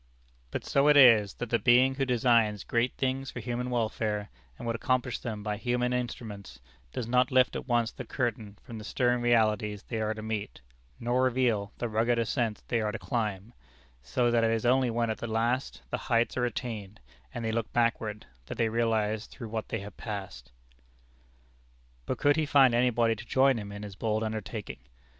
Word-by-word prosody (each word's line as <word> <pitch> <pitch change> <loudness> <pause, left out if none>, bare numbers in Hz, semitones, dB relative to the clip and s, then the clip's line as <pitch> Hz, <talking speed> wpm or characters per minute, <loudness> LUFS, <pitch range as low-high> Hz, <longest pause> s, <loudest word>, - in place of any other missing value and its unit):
But - - -5
so 140 +1 +3
it 150 -1 +6
is, 115 -7 +7
that 120 - -6
the 115 - +3
Being 125 +2 +5
who 135 0 -1
designs 115 -4 +2
great 120 +2 0
things 135 0 -1
for - - -6
human 120 +2 -3
welfare, 110 -3 -1 0.3
and - - -8
would 115 0 -1
accomplish 125 0 0
them 110 -3 -5
by 105 -1 -2
human 125 +2 0
instruments, 110 - -5 0.3
does 115 - -4
not 125 +1 +3
lift 130 -1 +3
at - - -5
once 120 -2 +1
the - - -7
curtain 110 -5 -3
from 115 -2 -8
the - - -8
stern 120 +2 +1
realities 110 -3 +2
they 115 -2 -4
are 110 0 -1
to 110 - -7
meet, 110 - -4 0.4
nor 120 +2 +1
reveal 120 -5 +1
the 120 - -2
rugged 115 +2 +1
ascents 115 -1 -1
they 115 -2 0
are 105 -1 -1
to 115 - -4
climb; 110 -3 -3 0.5
so 120 - +1
that 120 -1 +3
it 115 - +3
is 115 +1 0
only 130 +1 +3
when 115 0 0
at 110 - -6
last 115 - -1
the - - 0
heights 115 0 +2
are 125 - +1
attained, 110 -4 -5 0.3
and 120 -3 -5
they 110 - 0
look 115 0 -2
backward, 115 -3 0 0.2
that - - -6
they 115 -1 +2
realize 110 -1 0
through 115 -4 -9
what 110 0 -4
they 110 - -2
have 100 -1 -10
passed. 95 - -7 1.6
But - - -1
could 145 +1 +3
he 155 -1 +1
find 135 -4 +5
anybody 120 -1 +2
to 110 - -9
join 135 -2 +3
him 100 -1 -7
in 100 0 -7
his 100 -2 -8
bold 110 +1 -1
undertaking? 110 -1 -5
115 Hz, 195 wpm, -29 LUFS, 110-125 Hz, 1.6 s, is